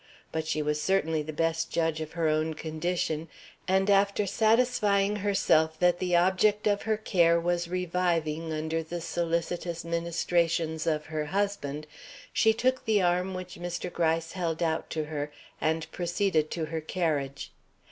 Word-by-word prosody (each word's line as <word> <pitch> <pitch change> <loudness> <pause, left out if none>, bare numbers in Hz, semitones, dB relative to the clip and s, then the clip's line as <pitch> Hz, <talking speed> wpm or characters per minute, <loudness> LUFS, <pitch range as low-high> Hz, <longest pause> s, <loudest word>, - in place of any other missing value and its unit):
But 160 0 -3
she 155 -1 0
was 150 0 -1
certainly 160 -5 +1
the 155 +1 -5
best 165 +1 0
judge 160 -1 0
of 155 0 -6
her 165 -1 0
own 155 +1 +1
condition; 160 0 -2 0.4
and 190 +1 +2
after 200 +1 +3
satisfying 210 -2 +2
herself 185 -6 +2
that 175 +1 +3
the 180 -1 +1
object 190 +4 +3
of 205 -1 +2
her 220 -1 0
care 170 -5 +3
was 175 0 0
reviving 170 -3 -1
under 160 +1 -1
the 170 +2 -5
solicitous 170 0 -2
ministrations 170 -1 0
of 155 -1 0
her 155 -1 -3
husband, 155 -5 -2 0.5
she 225 - +4
took 255 +3 0
the 220 -2 +3
arm 180 +1 +1
which 180 -1 -7
Mr. 175 0 -4
Gryce 165 -1 0
held 170 -3 -2
out 160 -1 -1
to 155 - -2
her 150 -1 -4 0.3
and 160 0 0
proceeded 175 -3 0
to 165 -2 -2
her 160 +1 -4
carriage. 150 -5 -2
170 Hz, 155 wpm, -28 LUFS, 160-185 Hz, 0.5 s, she